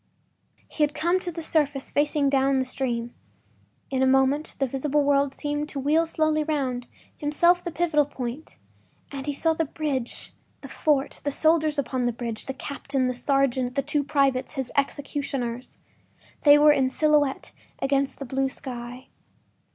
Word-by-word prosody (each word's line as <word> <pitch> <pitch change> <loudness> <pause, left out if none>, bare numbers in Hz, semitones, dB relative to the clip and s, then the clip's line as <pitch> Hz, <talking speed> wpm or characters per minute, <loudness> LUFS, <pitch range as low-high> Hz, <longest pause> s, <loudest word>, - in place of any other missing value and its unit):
He - - -6
had 295 0 +2
come 345 +3 +1
to 360 -1 -4
the 330 0 -6
surface 290 -4 0
facing 290 0 +1
down 275 0 +2
the 260 - +1
stream; 240 -2 -2 0.8
in 265 -1 0
a 265 - +4
moment 270 +3 +2
the 275 - +1
visible 275 +3 0
world 280 -1 +2
seemed 295 0 -3
to 280 - -5
wheel 310 +4 +2
slowly 310 -1 +1
round, 260 -5 -2 0.3
himself 340 +4 +2
the 345 - -3
pivotal 315 -3 +1
point, 260 +1 -6 0.5
and 275 0 -6
he 290 - 0
saw 320 +3 +1
the 325 - 0
bridge, 280 -5 -4 0.3
the - - -10
fort, 290 -3 0
the 290 - 0
soldiers 310 +1 +2
upon 255 -2 -1
the 240 - +2
bridge, 230 -2 -5
the 270 - -3
captain, 275 -1 -3
the 255 - 0
sergeant, 260 -1 +1
the 275 - +1
two 295 +1 0
privates, 275 -2 +1
his 265 -4 -4
executioners. 275 -3 -2 0.7
They 290 0 +9
were 300 0 +7
in 265 -3 +2
silhouette 295 -1 +1 0.3
against 275 0 0
the 275 - -6
blue 270 +1 -1
sky. 250 -1 -8
280 Hz, 165 wpm, -25 LUFS, 265-300 Hz, 0.8 s, They